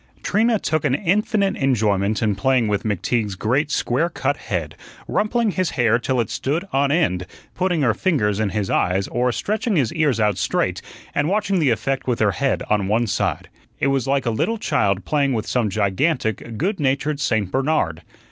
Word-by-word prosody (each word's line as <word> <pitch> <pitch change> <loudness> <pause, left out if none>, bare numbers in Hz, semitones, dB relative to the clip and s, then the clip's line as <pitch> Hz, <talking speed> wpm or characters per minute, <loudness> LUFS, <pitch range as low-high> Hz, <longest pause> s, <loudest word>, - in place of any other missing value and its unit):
Trina 225 +2 +2
took 155 -6 -1
an 140 -3 +2
infinite 200 +2 +1
enjoyment 110 -5 +1
in 105 -2 +2
playing 130 +1 +1
with 105 -1 0
McTeague's 105 0 -1
great 130 +10 0
square 145 +4 0
cut 145 -4 -1
head, 85 - -4 0.3
rumpling 220 +1 +1
his 185 -3 0
hair 120 -1 +3
till 130 +1 -1
it 115 - -1
stood 155 +7 -2
on 140 +1 +2
end, 120 - +1 0.3
putting 180 -4 0
her 115 -4 +3
fingers 105 - 0
in 110 -2 +1
his 105 0 -2
eyes, 95 +2 +1
or 125 +1 +1
stretching 215 - -1
his 130 -9 +1
ears 145 -7 +1
out 105 -3 +1
straight, - - 0 0.3
and 145 +2 +1
watching 200 -1 +1
the 150 -5 +3
effect 130 +5 -1
with 125 -2 +1
her 105 -2 +3
head 135 +9 -1
on 105 -2 +1
one 110 +4 +2
side. 105 - -1 0.3
It - - +1
was 135 -2 -1
like 135 -1 +1
a 115 - +1
little 225 - 0
child 100 - 0
playing 140 -3 +1
with 110 -3 -2
some 120 -4 0
gigantic, 110 - -1
good 190 - -1
natured 140 +1 0
Saint 110 -8 0
Bernard. 130 - 0
130 Hz, 185 wpm, -21 LUFS, 105-155 Hz, 0.3 s, hair